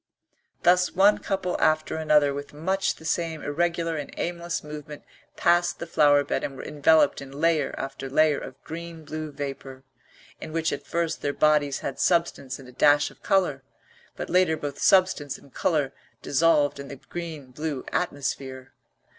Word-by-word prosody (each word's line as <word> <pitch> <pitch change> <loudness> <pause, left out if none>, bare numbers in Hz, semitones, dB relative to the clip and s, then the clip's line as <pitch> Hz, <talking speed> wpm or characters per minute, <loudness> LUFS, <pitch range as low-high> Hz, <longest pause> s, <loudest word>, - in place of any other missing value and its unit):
Thus 180 +1 +4
one 200 +3 +5
couple 185 -2 -2
after 155 0 +2
another 150 -2 +3
with 145 +1 -7
much 190 +6 0
the 160 - -14
same 160 -2 -1
irregular 165 +1 -1
and 145 - -6
aimless 170 0 -3
movement 150 -1 -9 0.3
passed 175 0 +3
the - - -5
flower 145 -3 +4
bed - - -2
and 135 - -4
were - - -7
enveloped 150 0 +3
in 140 - -9
layer 160 -3 +1
after 135 0 -5
layer 155 +1 +3
of 130 - -10
green 165 0 -8
blue 155 0 -5
vapour, 135 -2 -7 0.6
in - - -8
which 165 0 0
at 145 0 -6
first 170 -1 -1
their 145 - -1
bodies 150 -2 +2
had 135 - -5
substance 170 -7 +1
and 135 - -13
a - - -12
dash 145 +3 +4
of - - -21
colour, 180 -8 +1 0.5
but - - -5
later 180 -3 +3
both 145 -2 -5
substance 185 -7 +3
and 140 - -20
colour 145 -5 0 0.3
dissolved 145 -1 +3
in 140 - -7
the 140 - -7
green 155 -3 -8
blue 150 0 -4
atmosphere. 135 -5 -3
150 Hz, 165 wpm, -26 LUFS, 140-170 Hz, 0.6 s, one